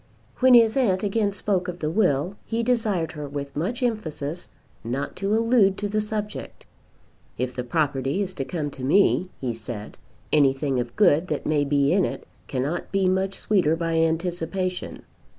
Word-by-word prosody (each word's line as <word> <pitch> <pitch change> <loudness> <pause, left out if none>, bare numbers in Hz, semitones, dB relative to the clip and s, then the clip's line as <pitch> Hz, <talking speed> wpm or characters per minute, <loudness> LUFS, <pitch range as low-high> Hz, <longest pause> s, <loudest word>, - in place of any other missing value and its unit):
When 255 -1 +7
his 225 -2 +6
aunt 210 -8 +2
again 205 0 +1
spoke 195 -2 -1
of 180 -1 -4
the 155 -3 -2
will 170 -2 +1
he 230 0 -2
desired 220 -9 0
her 150 -2 -6
with 140 0 -6
much 215 - -2
emphasis 175 -8 -3 0.3
not 130 +5 -3
to 200 +2 0
allude 225 -4 +3
to 205 - -2
the 215 +1 0
subject. 210 - -5 0.7
"If 125 +1 -2
the 125 - -3
property 145 +4 0
is 190 -1 -5
to 135 - -3
come 150 -3 -3
to 130 - -9
me," 185 +5 +3
he 125 -3 -2
said, 110 -1 -8 0.3
"anything 135 -2 +3
of 120 -1 -4
good 175 -4 +4
that 150 - -3
may 150 -2 +2
be 140 +1 +2
in 195 0 +3
it - - -4 0.2
cannot 140 +6 -3
be 195 -1 +2
much 190 +1 0
sweeter 180 -7 +2
by 165 0 -1
anticipation. 175 +2 -2
175 Hz, 170 wpm, -24 LUFS, 145-205 Hz, 0.7 s, When